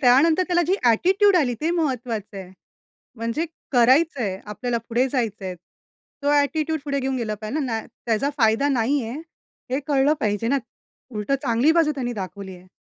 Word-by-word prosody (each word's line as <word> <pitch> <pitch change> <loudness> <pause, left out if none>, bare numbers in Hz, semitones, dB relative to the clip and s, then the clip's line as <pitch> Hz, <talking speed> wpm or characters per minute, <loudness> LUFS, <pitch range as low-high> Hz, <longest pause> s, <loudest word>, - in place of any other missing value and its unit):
त्यानंतर 300 +7 +5
त्याला 350 -1 +2
जी 370 - +3 0.2
एटिट्यूड 380 - +4
आली, 255 -7 +2
ते 315 +2 0
महत्त्वाचं 245 - -2
आहे. 185 -2 -8 0.7
म्हणजे, 230 +8 -2 0.3
करायचं 265 +4 +4
आहे, 190 -4 -2
आपल्याला 235 +3 -2
पुढे 245 +3 +2
जायचं 225 -7 -2
आहे. 185 -1 -4
तो 280 - -7
एटिट्यूड 315 +2 0
पुढे 280 -1 -1
घेऊन 265 0 -1
गेला 220 -3 -2
पाहिजे 220 +8 -3
ना, 225 -3 -1 0.3
त्याचा 230 +4 +1
फायदा 225 +4 +3
नाहीये 255 -1 +1
आहे. 265 +6 -5 0.5
हे 265 - +1
कळलं 285 +1 +3
पाहिजे 210 +1 -1
ना. 280 +4 +2 0.6
उलट 210 +4 -4
चांगली 245 +3 +3
बाजू 325 -2 +3
त्यांनी 245 -3 -3
दाखवली 195 -2 -7
आहे. 180 +1 -17
250 Hz, 170 wpm, -23 LUFS, 220-295 Hz, 0.7 s, त्यानंतर